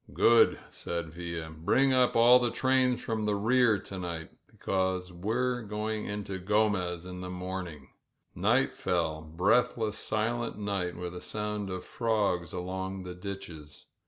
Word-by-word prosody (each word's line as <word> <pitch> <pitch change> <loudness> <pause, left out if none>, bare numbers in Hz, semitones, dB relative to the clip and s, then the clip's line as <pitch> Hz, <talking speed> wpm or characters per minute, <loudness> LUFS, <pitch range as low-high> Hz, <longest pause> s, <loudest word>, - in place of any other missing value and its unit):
^^Good," 115 0 +5
said 85 -2 -4
Villa. 85 -2 -5
''Bring 130 +12 +3
up 125 -1 +4
all 120 +2 +8
the 120 -1 +1
trains 130 0 +2
fi 115 - -3
the 105 -1 +1
rear 115 +1 +4
to 95 0 -7
night, 85 -2 -5 0.2
because 95 -1 -2
we're 120 +7 -1
going 105 0 -3
into 100 -2 -4
Gromez 95 -3 +1
in 90 0 -7
morning 90 -3 -5
f - - -31
Night - - +2
feU; 80 -3 -1
breathless, 105 +7 +1
silent 115 +2 -1
night, 100 -4 -2
with 90 0 -5
a 90 - -6
sounc 105 -3 -3
frogs 100 -8 0
along 95 +1 -4
the 90 0 -6
ditches. 90 -6 -8
95 Hz, 140 wpm, -30 LUFS, 90-110 Hz, 0.2 s, all